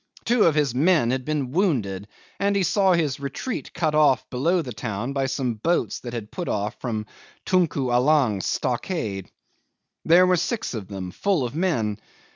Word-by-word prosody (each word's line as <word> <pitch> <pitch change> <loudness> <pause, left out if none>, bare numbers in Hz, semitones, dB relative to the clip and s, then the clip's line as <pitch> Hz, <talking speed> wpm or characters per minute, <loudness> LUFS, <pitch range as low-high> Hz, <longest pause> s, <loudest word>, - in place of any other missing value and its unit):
Two 240 -1 +4
of 160 - +3
his 145 -5 +1
men 150 -3 +3
had 130 -1 -2
been 145 -4 -2
wounded, 115 - 0 0.3
and 200 +1 +1
he 195 - +2
saw 190 +1 +3
his 155 -6 0
retreat 140 - -5
cut 160 -3 -1
off 150 -4 +3
below 165 +8 +1
the 125 -4 -6
town 110 +4 -4
by 135 -1 0
some 130 -2 -1
boats 165 +11 -1
that 120 - -7
had 110 -3 -6
put 175 - -5
off 105 +2 -2
from 110 -4 -3 0.4
Tunku 160 -8 +1
Allang's 125 -6 +3
stockade. 115 - -2 0.7
There 175 +3 +6
were 180 0 +3
six 215 - -2
of 105 -5 -5
them, 95 -3 -6
full 185 - 0
of 120 - -5
men. 115 - 0
135 Hz, 175 wpm, -24 LUFS, 115-170 Hz, 0.7 s, There